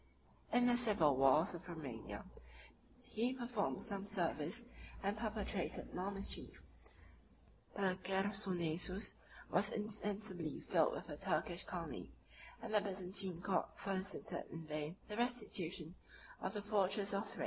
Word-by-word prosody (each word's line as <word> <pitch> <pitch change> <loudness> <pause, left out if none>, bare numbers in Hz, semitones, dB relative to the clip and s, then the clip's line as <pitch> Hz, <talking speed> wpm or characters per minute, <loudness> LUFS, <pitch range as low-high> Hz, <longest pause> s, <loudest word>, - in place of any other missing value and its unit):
In 245 0 +5
the 245 0 +6
civil 200 - +5
wars 135 +7 +6
of 175 +1 -7
Romania, 135 -10 -5 0.8
he 240 +4 +1
performed 240 -4 0
some 200 -2 -3
service 175 +1 0 0.4
and 200 +1 +2
perpetrated 215 -3 -2
more 185 +2 -1
mischief; 195 0 -2 1.2
but 190 -2 +1
the 185 - -5
Chersonesus 190 -1 0 0.4
was 200 +4 +4
insensibly 210 -6 -2
filled - - +3
with - - -5
a - - -5
Turkish - - 0
colony; - - -4 0.5
and 225 -1 -4
the 210 - +6
Byzantine 190 -2 -1
court 195 -2 +1
solicited 195 +3 -1
in 165 -1 -6
vain 155 +1 -3
the 210 - -4
restitution 190 -8 -1 0.5
of 190 - -1
the 205 - -2
fortresses 200 -1 +2
of 200 +2 +1
Thrace. - - -5
195 Hz, 130 wpm, -40 LUFS, 175-210 Hz, 1.2 s, the